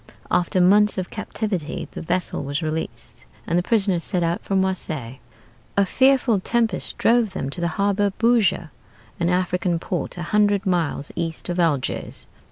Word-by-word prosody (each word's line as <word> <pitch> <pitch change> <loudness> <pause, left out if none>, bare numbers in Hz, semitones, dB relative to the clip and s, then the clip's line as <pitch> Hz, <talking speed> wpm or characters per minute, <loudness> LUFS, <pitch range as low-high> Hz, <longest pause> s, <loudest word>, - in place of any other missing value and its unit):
After 180 +1 +1
months 205 +4 +5
of 185 -1 -3
captivity 210 -7 -3
the - - -7
vessel 175 -2 -2
was 145 +3 -3
released, 155 +1 -5 0.2
and 170 - -1
the 175 - +3
prisoner 195 -3 +2
set 175 +1 0
out 170 +1 0
for 195 - -3
Marseilles. 155 -10 -2 0.6
A 200 - +5
fearful 260 -1 +3
tempest 225 0 0
drove 230 -4 +3
them 135 -7 -3
to 175 - +2
the 170 - +1
harbor 200 0 +2
of 195 - -6
Bougie, 230 -8 +2 0.5
an 170 0 +1
African 180 -1 0
port 175 +1 -3
a 175 - -4
hundred 205 +2 +2
miles 170 -6 0
east 165 +1 -4
of 175 0 -2
Algiers. 150 -6 -1
180 Hz, 165 wpm, -22 LUFS, 170-205 Hz, 0.6 s, months